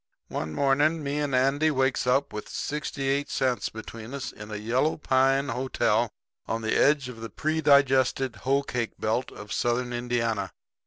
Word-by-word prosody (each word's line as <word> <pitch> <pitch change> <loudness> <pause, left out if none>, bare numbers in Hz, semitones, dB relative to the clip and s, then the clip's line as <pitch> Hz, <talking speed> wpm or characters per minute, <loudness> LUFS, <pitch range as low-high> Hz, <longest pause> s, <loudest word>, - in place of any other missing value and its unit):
"One 80 - -3
morning 145 +3 +2
me 140 +1 -1
and 145 -3 0
Andy 135 +4 +3
wakes 130 -3 +1
up 135 +3 +2
with 105 - -6
sixty 145 -2 -3
eight 140 +1 0
cents 130 -2 0
between 110 +3 -8
us 135 - -4
in 105 0 -10
a 105 - -5
yellow 120 +8 0
pine 135 -1 +2
hotel 130 +2 +1 0.4
on 115 0 -2
the 110 - 0
edge 145 -2 +3
of 120 -3 -9
the 115 - -5
pre 155 +8 -1
digested 135 -4 +3
hoe 135 +7 +1
cake 120 -4 -3
belt 115 +4 -1
of 105 -1 -8
Southern 120 +1 0
Indiana. 115 -5 -1
130 Hz, 170 wpm, -27 LUFS, 115-140 Hz, 0.4 s, Andy